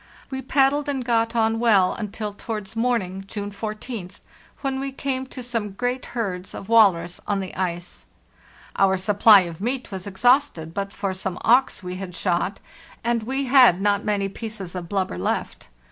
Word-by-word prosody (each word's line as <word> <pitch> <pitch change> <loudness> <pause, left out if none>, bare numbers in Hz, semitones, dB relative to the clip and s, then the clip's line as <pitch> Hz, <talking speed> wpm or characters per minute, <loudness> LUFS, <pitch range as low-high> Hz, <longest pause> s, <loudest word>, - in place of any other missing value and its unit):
We 265 0 -3
paddled 280 +2 +2
and 265 -3 -2
got 230 -1 +1
on 225 0 +2
well 205 -6 +4
until 210 -1 -5
towards 210 0 -6
morn 235 -2 +1
ing 190 +1 -7
(June 205 0 -5
14th), 210 -1 -6 0.4
when 270 -1 -1
we 275 0 -3
came 265 -1 -3
to 255 -1 -8
some 230 -4 -3
great 245 +5 -2
herds 185 -5 -3
of 195 - -8
walrus 180 -7 +4
on 205 -1 0
the 190 -1 -5
ice. 175 -1 -4 0.7
Our 190 -1 +4
supply 205 +2 +6
of 170 -1 -6
meat 250 +2 -2
was 190 0 -6
exhausted 195 - +2
but 200 +1 -3
for 200 -2 -3
some 185 -1 -4
auks 245 -3 +3
we 180 0 -5
had 185 -2 -7
shot, 180 +2 -1 0.4
and 235 0 +1
we 265 +5 -2
had 250 -8 +6
not 205 0 +1
many 205 -2 0
pieces 200 -3 -6
of 175 -2 -6
blubber 190 - -1
left. - - -3
210 Hz, 175 wpm, -23 LUFS, 190-245 Hz, 0.7 s, supply